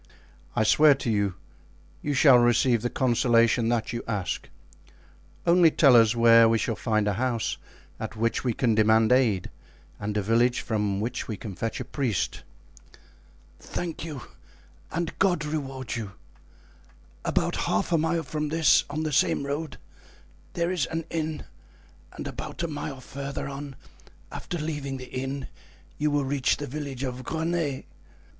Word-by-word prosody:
"I 110 - +3
swear 150 +6 +6
to 125 -3 -2
you, 100 -3 0 0.7
you 145 -1 -2
shall 130 -2 +7
receive 120 0 +3
the 120 - -1
consolation 120 -2 +2
that 120 -1 -1
you 120 - -4
ask. 105 -5 -3 1.0
Only 170 -1 +6
tell 140 -4 +5
us 115 0 +5
where 115 -1 +6
we 115 - +3
shall 115 0 -1
find 110 -2 0
a 105 - +1
house 120 -3 -1 0.4
at - - -5
which 115 +1 0
we 125 - +1
can 115 0 +1
demand 110 +1 +4
aid 120 -8 +2 0.5
and 105 0 -3
a 105 - 0
village 120 +4 +2
from 105 -3 -1
which 120 +3 -3
we 110 - -4
can 105 -1 -7
fetch 115 +4 -4
a - - -4
priest." 125 - -2 1.2
"Thank 170 -2 -5
you, 150 -6 -6 0.7
and 170 0 -2
God 175 -6 +2
reward 135 -4 -4
you! 105 -5 -5 1.1
About - - 0
half 100 - 0
a 165 - +4
mile 165 +1 0
from 150 +1 -3
this, 160 0 +4
on 155 +2 -3
the 155 -1 -2
same 140 0 +2
road, 145 +2 -4 0.8
there 170 +1 0
is 170 -8 0
an 165 0 -4
inn, 160 -2 -3 0.7
and - - -6
about - - -6
a - - 0
mile 145 -3 -5
further 140 +1 -6
on, 140 0 -7 0.6
after 175 - -5
leaving 145 -4 -4
the 130 0 -10
inn, 135 +1 -4 0.5
you 150 +1 +2
will 145 -1 0
reach 135 -1 +1
the 145 - -5
village 140 -1 -5
of 130 -1 -4
Greney. 160 -1 -2
130 Hz, 155 wpm, -26 LUFS, 115-150 Hz, 1.2 s, shall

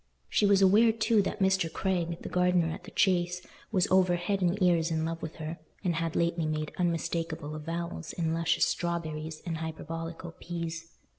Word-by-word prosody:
She 205 - +3
was 200 -1 +5
aware, 215 +4 +6
too, 225 -1 +3
that 190 - -2
Mr. 190 -4 +2
Craig, 175 -3 -1
the - - -5
gardener 180 -2 +2
at 175 - -9
the - - -9
Chase, 180 -3 +2 0.3
was 185 -4 +3
over 185 -1 +5
head 190 +3 -1
and 180 +3 +1
ears 175 -3 +3
in 160 -1 0
love 165 0 -3
with 160 - -6
her, 160 +1 -6 0.2
and 180 -3 +1
had 165 -1 -2
lately 170 -1 +1
made 155 0 -2
unmistakable 165 -2 -1
avowals 165 +2 -4
in 165 -2 -1
luscious 165 0 +2
strawberries 160 -2 -3
and 165 -2 -2
hyperbolical 165 +1 -5
peas. 170 -1 -5
170 Hz, 175 wpm, -29 LUFS, 165-180 Hz, 0.3 s, aware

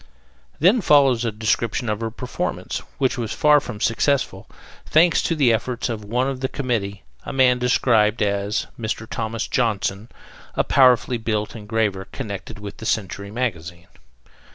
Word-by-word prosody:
Then 195 +10 +4
follows 135 -8 +4
a 115 - 0
description 110 +3 -1
of 105 -1 -1
her 115 -1 -2
performance, 125 +3 -4 0.2
which 130 -2 0
was 115 -2 -3
far 150 -1 +5
from 120 -6 -8
successful, 115 -4 0 0.3
thanks 165 +2 +4
to 165 - 0
the 135 -6 +4
efforts 120 +3 -2
of 110 -3 -4
one 120 +5 0
of 135 -1 -3
the 130 - -1
committee, 110 - -3 0.2
a - - -6
man 130 -2 +3
described 115 -3 +2
as 100 0 -1
"Mr. 110 -1 -3
Thomas 115 0 -3
Johnson, 110 -3 -1 0.5
a - - +2
powerfully 125 -2 +4
built 110 -1 -2
engraver 105 -3 -1
connected 100 -6 -7
with 105 -1 -8
the 110 - -9
Century 100 -1 -2
magazine." 85 -7 -4
115 Hz, 155 wpm, -22 LUFS, 105-130 Hz, 0.5 s, far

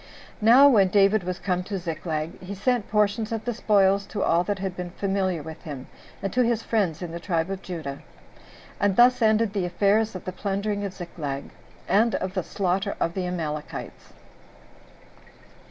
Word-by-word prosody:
Now 245 +6 +8
when 210 -8 +5
David 200 +1 +3
was 180 0 -3
come 180 -2 -1
to 200 0 -3
Ziklag, 165 -2 -4
he 190 +2 -6
sent 235 +2 0
portions 210 +1 +1
of 225 -1 -3
the 240 - -1
spoils 200 -3 +3
to 205 -2 -3
all 170 +1 +3
that 205 0 -1
had 190 -1 -4
been 180 -1 -5
familiar 190 -3 -1
with 160 0 -9
him, 140 -6 -7 0.4
and 195 - -2
to 250 - +3
his 235 -2 +1
friends 185 -7 0
in 170 - -5
the 170 - -5
tribe 170 0 -1
of 195 -1 -4
Judah. 155 -6 -6 0.8
And 205 -2 +2
thus 250 +2 +5
ended 220 -1 +3
the 195 -4 0
affairs 210 +4 +2
of 185 - -7
the 185 - -3
plundering 200 +2 -2
of 195 -2 -4
Ziklag, 150 -6 -6 0.4
and 225 +3 +3
of 185 0 -3
the 190 - 0
slaughter 195 +3 -1
of 170 - 0
the 185 -1 -2
Amalekites. 155 -4 -5
195 Hz, 180 wpm, -25 LUFS, 175-210 Hz, 0.8 s, Now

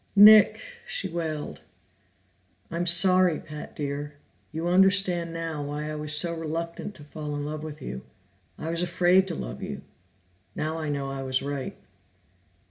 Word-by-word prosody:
"Nick!" 210 +1 +9 0.3
she 195 - -2
wailed. 160 -4 -4 1.1
"I'm 170 +1 -1
sorry, 185 0 +5
Pat 150 -1 -9
dear. 145 0 -4 0.4
You 160 +2 -3
understand 185 -2 +3
now 165 -2 -4
why 150 +1 -4
I - - -4
was 150 0 -2
so 170 +1 +2
reluctant 165 +4 -4
to 150 - -12
fall 150 0 -6
in 145 0 -3
love 150 +1 -4
with 155 -1 -8
you. 65 - -5 0.6
I 160 - -4
was 170 0 -1
afraid 180 +2 +3
to 180 - -3
love - - -6
you; - - -6 0.7
now 155 +1 -2
I 155 -2 -3
know 140 -1 -2
I 135 0 -4
was 130 -1 0
right." 140 -2 -4
160 Hz, 155 wpm, -26 LUFS, 150-175 Hz, 1.1 s, Nick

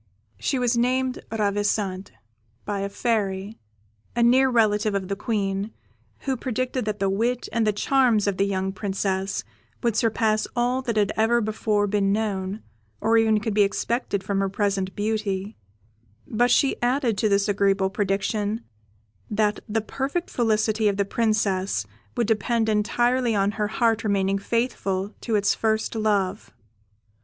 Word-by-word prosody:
She 270 - 0
was 245 -1 +1
named 255 +2 +1
Ravissante, 205 -2 -1 0.5
by 205 -1 -2
a 200 0 -2
Fairy, 200 -2 -1 0.6
a 240 - +3
near 260 +3 +5
relative 215 -3 +2
of 190 -1 -2
the 200 - -1
Queen, 200 -1 -2 0.5
who 270 - -1
predicted 255 0 -2
that 210 -1 -2
the 195 -1 0
wit 230 +6 0
and 230 -2 +1
the - - +4
charms 235 0 +2
of 200 -2 0
the 195 - +2
young 190 -1 -1
Princess 195 -1 -2 0.4
would 235 -3 +1
surpass 220 -1 +1
all 245 +2 +1
that 240 -4 -2
had 205 -1 +2
ever 225 +2 +3
before 215 -1 0
been 200 -1 +1
known 200 -1 -2 0.4
or 225 - +2
even 220 -1 +3
could 215 0 -2
be 210 - +3
expected 200 0 0
from 200 -1 -1
her 195 0 +1
present 195 -1 -1
beauty; 210 -1 -2 0.7
but 240 +3 +1
she 270 +2 +2
added 245 -2 +1
to 215 - +2
this 200 0 +2
agreeable 195 -1 +2
prediction, 205 +2 -1 0.7
that 210 0 +1
the 220 +1 0
perfect 275 +10 -3
felicity 220 -2 +1
of 200 -1 +1
the 200 - +1
Princess 200 - 0 0.3
would 235 - +2
depend 225 +1 +1
entirely 240 +3 +1
on 200 0 +2
her 210 0 -1
heart 225 0 +1
remaining 195 -2 +1
faithful 200 -3 -1
to 225 - -1
its 205 -1 +3
first 220 -1 0
love. 210 -4 0
215 Hz, 150 wpm, -24 LUFS, 200-230 Hz, 0.7 s, near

